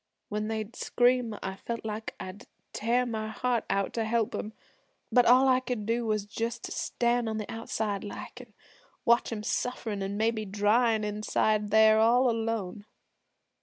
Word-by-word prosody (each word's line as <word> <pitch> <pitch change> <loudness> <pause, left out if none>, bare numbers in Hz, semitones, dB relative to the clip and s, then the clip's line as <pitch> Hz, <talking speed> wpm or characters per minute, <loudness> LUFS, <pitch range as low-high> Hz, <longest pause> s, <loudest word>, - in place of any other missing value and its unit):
'When 210 0 -2
they'd 220 +1 -4
scream, 245 -3 +1
I 190 0 -3
felt 230 +2 -5
like 215 0 -5
I'd 185 +2 -8 0.3
tear 240 +3 +1
my 220 -2 -3
heart 235 +2 -1
out 195 0 0
to 230 - -1
help 225 0 0
'em. 215 - -4 0.6
But 245 -1 +5
all 255 +3 +6
I 255 -1 +5
could 245 -4 -4
do 230 +1 0
was 215 -2 0
just 230 +2 -4
to - - -6
stand 240 -1 0
on 220 - -2
the 215 - -3
outside 220 -3 -3
like, 205 - -8
an' - - -17 0.5
watch 235 +1 +3
'em 215 -2 -4
sufferin' 220 -3 -2
an' 195 +1 -3
maybe 220 0 +1
dryin' 215 +3 +2
inside 210 0 0
there 220 0 +6
all 240 +3 +4
alone. 225 -3 -3
220 Hz, 165 wpm, -29 LUFS, 210-235 Hz, 0.6 s, all